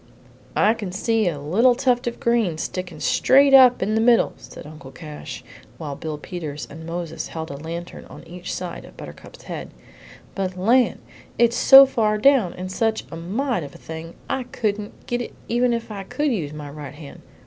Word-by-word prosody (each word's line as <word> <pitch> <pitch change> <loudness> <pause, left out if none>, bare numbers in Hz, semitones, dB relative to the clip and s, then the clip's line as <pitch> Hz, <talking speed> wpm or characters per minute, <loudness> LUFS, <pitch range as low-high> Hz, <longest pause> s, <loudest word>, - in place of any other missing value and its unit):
"I 215 - +4
can 205 -5 -6
see 220 +2 0
a 150 -4 -5
little 215 - +3
tuft 250 -1 +1
of 235 - -4
green 230 -9 +1
sticking 180 +2 -5
straight 275 +1 +4
up 255 -5 +7
in 210 +3 -1
the 220 - +2
middle," 235 0 +4
said - - -12
Uncle 150 -3 -11
Cash, 150 -1 -9 0.3
while 145 -3 -5
Bill 155 0 -5
Peters 150 -2 -6
and 160 +2 -9
Moses 165 -1 -5
held 160 -2 -6
a - - -6
lantern 170 +3 -7
on - - -13
each 175 +1 -7
side 180 -1 -5
of - - -15
Buttercup's - - -11
head; - - -6 0.6
"but, 185 -2 -3
land! 240 +7 +2 0.4
It's 235 0 +3
so 270 +2 +9
far 220 -5 +1
down, 240 -5 +4
and 185 +1 -6
such 220 +2 -1
a - - -6
mite 210 +7 -2
of 140 -2 -9
a - - -10
thing, 160 +1 -9
I 265 - -1
couldn't 215 -4 -4
git 240 0 -2
it, - - -7
even 240 +1 +2
if 230 -1 -3
I 200 -2 -5
could 290 +9 -1
use 165 -11 -2
my 150 -1 -8
right 145 -1 -9
hand. 150 -2 -11
195 Hz, 190 wpm, -22 LUFS, 160-240 Hz, 0.6 s, so